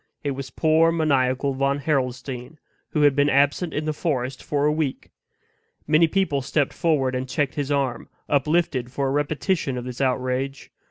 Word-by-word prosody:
It 145 - -1
was 135 0 -5
poor, 160 +3 +3
maniacal 140 -4 +1
Von 140 +1 +1
Harrelstein, 130 -1 -2 0.3
who 150 - +1
had 145 -2 +5
been 145 0 +3
absent 145 +5 +2
in 150 - -3
the 155 - -1
forest 135 -5 -2
for 145 -1 0
a 150 - +4
week. 150 -3 -3 0.7
Many 155 +2 +4
people 160 -6 0
stepped 140 +1 0
forward 150 -6 +1
and 130 0 -3
checked 140 +1 0
his 145 -1 -3
arm, 140 -4 -1 0.2
uplifted 145 -3 +1
for 140 +1 -1
a - - 0
repetition 145 0 -1
of 125 - -5
this 125 +1 -6
outrage. 130 +1 -1
140 Hz, 170 wpm, -23 LUFS, 130-155 Hz, 0.7 s, had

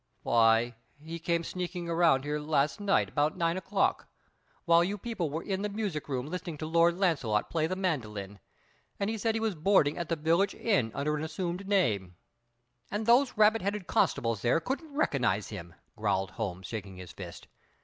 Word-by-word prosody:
"Why, 115 +1 +4 0.3
he 165 +3 -7
came 170 0 0
sneaking 180 0 -4
around 165 -5 +3
here 150 +1 -2
last 150 +1 +1
night 200 -1 +2
about 150 +1 0
nine 165 0 +1
o'clock 190 +2 0 0.6
while 170 -1 +5
you 200 +4 -2
people 205 -6 -3
were 160 +4 -4
in 195 -1 -2
the 210 - -1
music 200 -8 -3
room 130 -2 -2
listening 175 0 -5
to 155 - -5
Lord 170 +2 +3
Launcelot 140 - +1
play 160 -1 +1
the 185 - -2
mandolin, 105 - -3 0.6
and 200 +2 0
he 225 - -3
said 225 +1 0
he - - 0
was 220 -2 0
boarding 160 -2 +3
at 170 - -4
the 165 - +1
village 165 +6 +2
inn 190 - +1
under 150 +2 0
an 150 - -4
assumed 175 +4 -4
name 105 - +1 0.4
" 120 +1 -45
"And 210 +2 -2
those 245 +2 +4
rabbit 215 +1 +5
headed 200 0 -2
constables 115 - +1
there 120 +7 +3
couldn't 280 - -4
recognize 120 - +1
him!" 85 0 -8 0.2
growled 95 0 0
Holmes, 95 -5 -4
shaking 100 -4 -6
his 90 -1 -9
fist. - - -9
165 Hz, 185 wpm, -30 LUFS, 120-195 Hz, 0.6 s, while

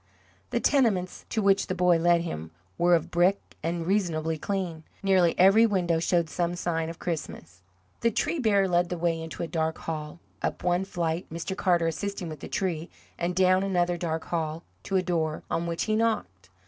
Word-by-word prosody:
The 235 - 0
tenements 225 -11 +1
to 220 - -1
which 195 0 +3
the 185 - -2
boy 180 -1 +4
led 170 0 +4
him 80 - -5 0.3
were 175 0 +4
of 165 - -2
brick, 180 +3 +3 0.2
and 165 +1 -2
reasonably 165 -5 0
clean. 175 -1 -3 0.2
Nearly 185 -3 +3
every 195 +5 +6
window 175 -5 +1
showed 170 0 +1
some 175 +2 -1
sign 165 -2 -1
of 165 - -7
Christmas. 95 - -5 0.4
The 230 - +3
tree 310 +8 -1
bearer 200 -6 +3
led 175 -1 +2
the 180 - -3
way 165 -1 0
into 160 +1 -5
a - - -3
dark 160 0 -1
hall, 155 0 -5 0.2
up - - -2
one 180 +1 +1
flight 170 -2 -2
Mr. 170 +4 -4
Carter 175 -3 +2
assisting 180 +2 -3
with 155 -2 -7
the - - -7
tree 175 -5 -2 0.3
and 175 +1 -1
down 185 0 +4
another 175 -3 +1
dark 165 -2 -3
hall, 160 -1 -3 0.2
to 195 - -2
a 185 - +1
door, 160 -3 -1
on 170 +1 -1
which 170 0 -1
he 215 - 0
knocked. 95 - -1
175 Hz, 190 wpm, -27 LUFS, 165-190 Hz, 0.4 s, every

